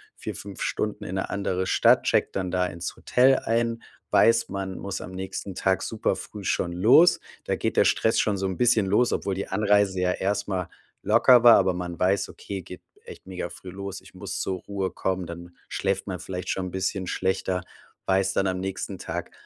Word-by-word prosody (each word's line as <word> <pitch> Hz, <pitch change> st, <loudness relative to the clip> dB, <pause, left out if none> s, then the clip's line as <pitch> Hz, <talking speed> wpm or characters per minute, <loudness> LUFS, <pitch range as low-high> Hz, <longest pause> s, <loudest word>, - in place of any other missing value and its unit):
4, -, -, -6 dB
5 100 Hz, -2 st, -8 dB
Stunden 105 Hz, 0 st, -2 dB
in 95 Hz, -2 st, -5 dB
'ne 95 Hz, -, -2 dB
andere 95 Hz, -2 st, -1 dB
Stadt, -, -, +4 dB
checkt -, -, +1 dB
dann 95 Hz, -1 st, -2 dB
da 90 Hz, 0 st, +1 dB
ins 85 Hz, 0 st, -6 dB
Hotel 130 Hz, +2 st, +3 dB
ein, 115 Hz, 0 st, -1 dB, 0.3 s
weiß, 115 Hz, 0 st, +4 dB
man 95 Hz, -1 st, -4 dB
muss 100 Hz, -1 st, -5 dB
am -, -, -8 dB
nächsten 95 Hz, +1 st, -6 dB
Tag 95 Hz, +1 st, +1 dB
super 110 Hz, -1 st, -1 dB
früh 105 Hz, -2 st, -9 dB
schon 85 Hz, -, 0 dB
los. 120 Hz, -, +6 dB, 0.3 s
Da -, -, 0 dB
geht -, -, -2 dB
der -, -, +5 dB
Stress 110 Hz, +1 st, +2 dB
schon 105 Hz, -2 st, +1 dB
so 95 Hz, -, -2 dB
'n 95 Hz, -1 st, -2 dB
bisschen 120 Hz, -4 st, +3 dB
los, 105 Hz, +6 st, +2 dB
obwohl 100 Hz, -, -1 dB
die 95 Hz, -, -4 dB
Anreise 100 Hz, -1 st, +2 dB
ja 90 Hz, 0 st, +2 dB
erst 100 Hz, +2 st, -1 dB
mal 90 Hz, -3 st, -2 dB, 0.3 s
locker 125 Hz, -2 st, +6 dB
war. 120 Hz, -1 st, +9 dB
Aber 95 Hz, -1 st, +2 dB
man 90 Hz, -1 st, -5 dB
weiß: 95 Hz, +2 st, +1 dB
„Okay, 100 Hz, -1 st, -7 dB
geht 90 Hz, +1 st, -11 dB, 0.2 s
echt -, -, -12 dB
mega 95 Hz, -1 st, -5 dB
früh 95 Hz, -, -10 dB
los. 100 Hz, 0 st, -6 dB
Ich -, -, -17 dB
muss -, -, -5 dB
zur 95 Hz, -1 st, -2 dB
Ruhe 100 Hz, -2 st, -3 dB
kommen.“ 95 Hz, -1 st, -2 dB
Dann 85 Hz, +1 st, -10 dB
schläft 95 Hz, 0 st, -1 dB
man 95 Hz, -2 st, -4 dB
vielleicht 90 Hz, -1 st, -6 dB
schon 95 Hz, -1 st, -1 dB
'n -, -, -7 dB
bisschen 95 Hz, 0 st, -2 dB
schlechter, 95 Hz, 0 st, -1 dB, 0.4 s
weiß, 95 Hz, 0 st, +2 dB
dann 100 Hz, -, +1 dB
am 95 Hz, -1 st, -1 dB
nächsten 95 Hz, 0 st, -4 dB
Tag -, -, -5 dB
95 Hz, 205 wpm, -25 LUFS, 95-100 Hz, 0.4 s, war